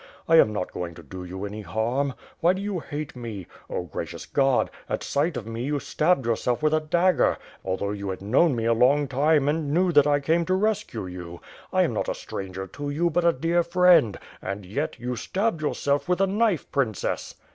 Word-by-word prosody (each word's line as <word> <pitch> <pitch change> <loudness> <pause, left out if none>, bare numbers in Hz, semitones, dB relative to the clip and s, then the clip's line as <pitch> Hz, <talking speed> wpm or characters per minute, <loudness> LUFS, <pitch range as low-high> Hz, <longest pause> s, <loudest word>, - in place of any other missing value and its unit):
I 165 - +6
am 110 - +6
not 100 -4 -3
going 85 -2 -5
to 85 - -12
do 90 +5 -8
you 95 +2 -6
any 105 +1 -6
harm. 120 +7 -1 0.3
WTiy 175 +2 +5
do 190 - -4
you 200 -3 -2
hate 150 -2 -6
me? 115 -6 -6 0.2
Oh, - - -2
gracious 85 - -6
God! 135 -2 +2 0.2
At - - -2
sight 145 +1 0
of 110 - -5
me, 115 +1 -4
you 145 +1 0
stabbed 155 -2 +1
yourself 120 +3 0
with 155 0 +3
a 155 - +4
dagger, 170 +3 +2 0.3
although 95 +2 -2
you 100 -1 -4
had 95 - -4
known 130 - +3
me 115 -1 -2
a 115 - +4
long 140 +5 +3
time 145 +2 +2
and 150 -1 0
knew 180 +3 +3
that 145 -3 +5
I 145 -1 +3
came 160 +4 +2
to 185 - +2
rescue 190 - -1
you. 90 -2 -8 0.3
I - - +3
am - - 0
not - - -1
a - - -1
stranger 95 0 -6
to 145 +8 -6
you, 170 +4 +1
but 175 +2 +1
a 170 - +6
dear 165 +4 +1
friend; 170 - +4 0.2
and, 100 +1 -5
yet, 95 - -3
you 125 +1 -3
stabbed 190 - -1
yourself 145 0 0
with 180 - +2
a 195 - +4
knife. 205 -2 0
Princess!" 120 -8 -1
140 Hz, 215 wpm, -25 LUFS, 105-165 Hz, 0.3 s, I